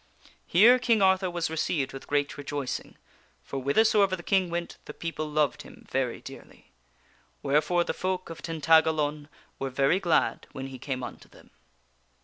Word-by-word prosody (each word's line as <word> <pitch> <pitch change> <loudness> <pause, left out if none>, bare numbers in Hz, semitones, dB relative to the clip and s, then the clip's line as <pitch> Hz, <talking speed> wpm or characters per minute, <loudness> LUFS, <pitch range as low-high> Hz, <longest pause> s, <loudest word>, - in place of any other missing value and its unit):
Here 230 +8 +6
King 230 -4 +2
Arthur 190 0 +3
was 175 -2 -2
received 150 -3 -1
with 135 - -9
great 145 -1 0
rejoicing; 145 -2 -5 0.5
for 135 - -5
whither 140 +11 +3
soever 200 -4 +3
the 175 - -11
King 190 -1 +2
went 170 0 -4
the - - -9
people 160 -2 -4
loved 150 -2 0
him - - -15
very - - -1
dearly. - - -13 0.7
Wherefore 150 +5 +2
the - - -3
folk 185 -2 -3
of 165 - -9
Tintagalon 155 -2 +2 0.3
were 135 - -2
very 140 +7 +2
glad 175 -4 +1
when 135 0 -6
he 130 -1 -9
came 130 -1 -4
unto 125 - -9
them. - - -19
160 Hz, 160 wpm, -27 LUFS, 145-185 Hz, 0.7 s, Here